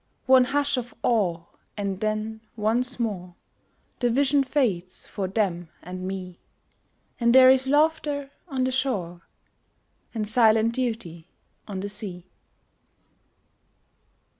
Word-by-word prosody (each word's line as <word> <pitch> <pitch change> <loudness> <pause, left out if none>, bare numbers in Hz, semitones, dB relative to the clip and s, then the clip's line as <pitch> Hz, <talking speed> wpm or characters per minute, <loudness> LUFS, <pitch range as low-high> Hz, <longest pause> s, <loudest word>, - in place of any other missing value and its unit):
One 260 -1 +6
hush 285 +1 0
of 245 -1 -5
awe, 190 -8 +1 0.4
and 200 -2 -2
then 215 +1 -2
once 240 +4 0
more 185 -6 -3 0.6
The 245 - +2
vision 275 +3 +3
fades 215 -10 -1
for 195 -3 -4
them 185 -4 -1
and 185 +1 -6
me, 185 -2 -6 0.8
And 235 0 +3
there 260 0 +9
is 265 0 +2
laughter 290 -1 +1 0.2
on 265 -5 -1
the 260 - +1
shore, 195 -10 -2 0.9
And 215 -2 -2
silent 225 0 +4
duty 225 -10 -4 0.4
on 195 -3 -5
the 205 - -4
sea. 195 -4 -7
220 Hz, 115 wpm, -25 LUFS, 190-260 Hz, 0.9 s, there